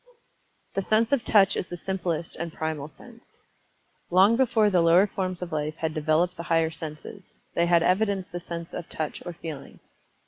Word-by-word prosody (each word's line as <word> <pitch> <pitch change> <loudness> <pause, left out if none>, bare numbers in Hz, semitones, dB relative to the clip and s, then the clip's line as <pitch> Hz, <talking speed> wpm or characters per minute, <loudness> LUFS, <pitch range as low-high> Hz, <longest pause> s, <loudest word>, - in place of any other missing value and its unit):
The 195 - 0
sense 215 +3 +2
of 280 -4 +2
Touch 195 -3 +4
is - - -3
the 175 - -6
simplest 175 -3 -3
and 170 -1 -5
primal 155 -2 -4
sense. 145 - -18 0.7
Long 190 +5 +5
before 225 -4 +3
the 180 -2 +4
lower 170 +4 +6
forms 185 -3 -3
of 175 - -7
life 155 0 -2
had 160 -1 -3
developed 160 +4 +1
the - - -4
higher 165 -1 +2
senses, 160 +4 -9 0.2
they 170 - +2
had 170 -1 +4
evidenced 195 0 +1
the 175 - -4
sense 170 -1 -7
of 175 - -6
Touch 155 -1 -4
or 175 - -4
Feeling. 160 -4 -9
175 Hz, 180 wpm, -26 LUFS, 160-190 Hz, 0.7 s, lower